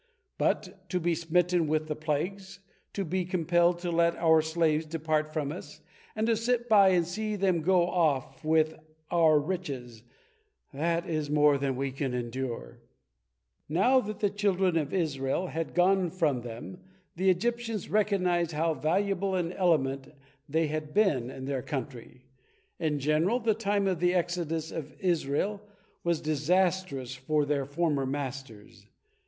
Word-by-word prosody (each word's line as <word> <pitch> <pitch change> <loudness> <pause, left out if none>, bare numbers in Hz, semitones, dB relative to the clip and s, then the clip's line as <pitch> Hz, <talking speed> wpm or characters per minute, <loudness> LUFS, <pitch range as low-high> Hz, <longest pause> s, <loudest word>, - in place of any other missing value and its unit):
But 190 0 -1
to 180 - 0
be 175 0 +1
smitten 170 +1 +1
with 155 +1 0
the 155 -1 -3
plagues, 180 +6 -3 0.3
to 195 - -2
be 185 +3 -1
compelled 175 -1 +2
to 175 -1 -2
let 170 0 +2
our 160 -1 +4
slaves 160 -1 0
depart 155 -1 -1
from 150 -2 -2
us, 175 - -9 0.3
and 220 - 0
to 230 0 +3
sit 240 +2 0
by 200 -4 +6
and 175 -2 +3
see 215 +5 -3
them 185 -4 +1
go 175 +1 +3
off 145 -7 0
with 155 0 +2 0.4
our 165 -3 +5
riches, 140 -9 -5 0.7
that 165 +4 -1
is 155 -3 -2
more 150 -1 +4
than 135 -1 -1
we 135 +1 -2
can 135 -1 -3
endure." 120 - -5 0.9
Now 220 - +4
that 215 -4 -5
the 205 -2 +2
children 195 -3 +1
of 150 -3 0
Israel 155 -3 -1
had 165 0 -4
gone 185 0 +3
from 155 -8 0
them 120 +10 -8 0.4
the 190 +2 +2
Egyptians 230 +3 -1
recognized 180 -5 +1
how 160 +2 +1
valuable 195 +4 0
an 175 -1 -1
element 140 -8 +1 0.4
they 160 +3 +2
had 155 +1 -4
been 150 - +2
in 130 0 -7
their 135 -1 -2
country. 130 -2 -7 0.5
In 155 -3 0
general, 155 - +1
the 225 -2 +2
time 205 -2 0
of 185 -4 0
the 180 +1 +2
exodus 165 -2 -1
of 150 -2 -6
Israel 180 +3 0 0.4
was 170 -2 0
disastrous 155 -3 0
for 145 +3 0
their 140 -1 0
former 145 -2 0
masters. 130 -7 -6
165 Hz, 150 wpm, -29 LUFS, 145-185 Hz, 0.9 s, by